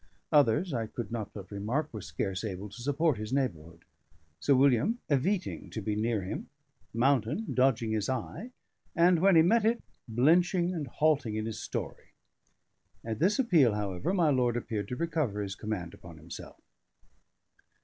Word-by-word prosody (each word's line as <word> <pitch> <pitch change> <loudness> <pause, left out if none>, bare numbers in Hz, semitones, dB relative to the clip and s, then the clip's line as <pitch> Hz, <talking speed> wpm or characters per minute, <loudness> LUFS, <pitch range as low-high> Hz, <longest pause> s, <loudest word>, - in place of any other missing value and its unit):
Others, 150 +3 +3
I 115 -3 -1
could 120 +1 -6
not 110 -3 -4
but 100 -1 -10
remark, 120 +10 -2
were 110 - -5
scarce 95 +1 -3
able 100 -1 -5
to 120 - -11
support 145 0 +1
his 110 0 -5
neighbourhood 85 - -3 0.5
Sir 140 - +3
William 135 - +3
eviting 180 +8 0
to - - -5
be 105 0 -2
near 110 -1 0
him, 95 - -5 0.4
Mountain 130 - +1
dodging 125 -4 +2
his 110 0 -1
eye, 130 - -4 0.5
and, 175 0 +5
when 190 +1 +5
he 160 - +7
met 225 +6 +3
it, 230 +2 +1 0.2
blenching 170 - +3
and 155 -5 -4
halting 140 -5 +1
in 110 0 -2
his 110 -1 -5
story. - - -6 0.9
At 110 -1 -3
this 195 +5 +3
appeal, 165 - +4
however, 100 - -2
my 175 -6 +3
lord 125 -3 +2
appeared 110 -3 -3
to 125 - -4
recover 150 -9 -1
his 95 -1 -4
command 95 -5 -5
upon 85 -3 -12
himself. 80 +3 -10
125 Hz, 160 wpm, -30 LUFS, 105-160 Hz, 0.9 s, he